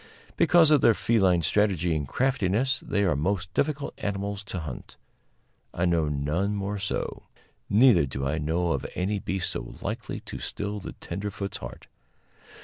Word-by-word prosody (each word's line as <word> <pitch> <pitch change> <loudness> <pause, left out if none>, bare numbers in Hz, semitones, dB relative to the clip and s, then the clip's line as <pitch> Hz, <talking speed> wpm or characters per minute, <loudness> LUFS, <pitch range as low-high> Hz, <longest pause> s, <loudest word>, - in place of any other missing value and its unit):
Because 165 -3 +6
of 150 -3 +6
their 115 - +5
feline 95 -7 +3
strategy 90 -2 +2
and 75 -3 -2
craftiness, 130 - +1
they 100 - -1
are 90 -6 +2
most 90 +4 -1
difficult 145 -1 -1
animals 100 0 -3
to 95 -3 -5
hunt; 70 -6 -8 0.8
I 90 - +1
know 85 -3 +2
none 75 +8 0
more 100 +1 -3
so. 95 - -3 0.4
Neither 105 - +6
do 65 +1 -4
I 80 +3 0
know 85 +3 0
of - - -1
any 100 +3 0
beast 95 -1 -2
so - - -6
likely - - -4
to - - -8
still 105 +1 -4
the - - -7
tenderfoot's 100 +1 -5
heart. - - -9
95 Hz, 155 wpm, -27 LUFS, 85-105 Hz, 0.8 s, Because